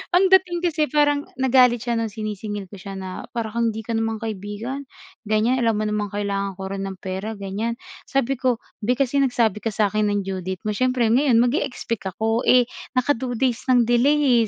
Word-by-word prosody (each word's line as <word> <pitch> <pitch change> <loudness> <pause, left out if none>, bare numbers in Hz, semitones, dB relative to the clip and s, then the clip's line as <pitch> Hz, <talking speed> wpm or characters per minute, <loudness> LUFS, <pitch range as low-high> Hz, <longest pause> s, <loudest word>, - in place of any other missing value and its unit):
Ang 380 +1 +4
dating 360 -2 +4
kasi 310 -3 +1
parang 290 +1 +2
nagalit 250 -2 +4
siya 235 -1 0
ng 225 - -1
sinisingil 210 -2 -5
ko 200 - -10
siya 195 +1 -7
na 190 -1 -6
para 225 -2 -2
kang 235 +1 +1
hindi 220 - -5
ka 235 - -5
naman 225 -1 -1
kaibigan 220 +6 -5 0.4
gan'yan, 220 +4 +2
alam 230 -2 +2
mo 215 - -1
namang 210 -1 -2
kailangan 200 -1 -2
ko 190 - -8
rin 195 0 -3
ng 190 - -6
pera 190 +4 -4
ganyan, 205 +4 -3 0.3
sabi 270 -1 0
ko 255 -2 +2 0.2
"Bi, 240 +4 +1
kasi 275 +1 +1
nagsabi 235 -6 +2
ka 220 - -4
sa 210 -2 +1
akin 215 0 +1
ng 205 -1 0
due 190 0 -4
date 185 +1 -5
mo 215 - -1
siyempre 255 0 +1
ngayon 260 +1 +4
mag-e-expect 240 -5 -2
ako, 225 +2 0
eh, 250 0 +7 0.3
naka 255 +3 +2
2 245 -1 -3
days 245 0 -1
ng 250 -2 +5
delay, 245 0 +3
230 Hz, 205 wpm, -23 LUFS, 205-255 Hz, 0.4 s, eh